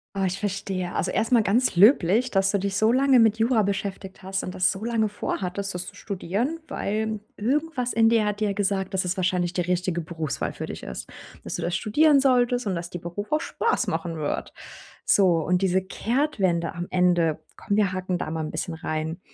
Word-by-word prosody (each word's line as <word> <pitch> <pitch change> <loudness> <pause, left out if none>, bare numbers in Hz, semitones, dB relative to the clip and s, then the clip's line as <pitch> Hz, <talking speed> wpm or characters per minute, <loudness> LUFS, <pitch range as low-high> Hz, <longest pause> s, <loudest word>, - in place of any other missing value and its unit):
Ah, 195 -1 +1
ich 185 +1 -3
verstehe. 195 -3 -3
Also, - - 0
erst 225 - 0
mal 240 -2 +5
ganz 225 +2 +2
löblich, 215 +3 +5
dass 195 -1 +3
du 200 - +1
dich 195 0 -2
so 220 +2 +3
lange 260 0 +5
mit 225 -1 +4
Jura 225 -1 +3
beschäftigt 195 -1 -4
hast 190 0 -2
und 180 - -5
das 185 -1 +2
so 195 +3 -7
lange 225 -2 +1
vorhattest, 200 -1 -3
das 180 0 -5
zu - - -10
studieren, 205 - -3
weil 215 -2 -2 0.2
irgendwas 260 +2 -1
in 225 0 +4
dir 225 -2 +3
hat 210 0 -2
dir 215 - +1
ja 200 - 0
gesagt, 195 -1 -1
dass 190 -1 0
es 180 +1 -1
wahrscheinlich 180 -1 0
die 180 - -1
richtige 180 0 -1
Berufswahl 160 -2 -3
für - - -6
dich - - -7
ist, 65 - -7 0.4
dass - - -5
du - - -3
das 175 - -1
studieren 290 +6 +4
solltest 250 -2 +2
und 195 - 0
dass 170 +1 -5
die 175 - -5
Beruf 175 +5 -6
auch 305 +1 +2
Spaß 450 - 0
machen 165 -1 -3
wird. 150 -2 -3 0.5
So, 200 - +4 0.2
und 180 +1 +1
diese 190 0 +2
Kehrtwende 190 - -1
am 175 0 -5
Ende: 175 -3 +2 0.2
„Komm, 205 - -2
wir 200 -3 +2
hacken 185 -1 -2
da 155 - -4
mal 160 - -3
'n 155 - -5
bisschen 170 - -4
rein.” 160 +2 -4
195 Hz, 215 wpm, -25 LUFS, 180-225 Hz, 0.5 s, mal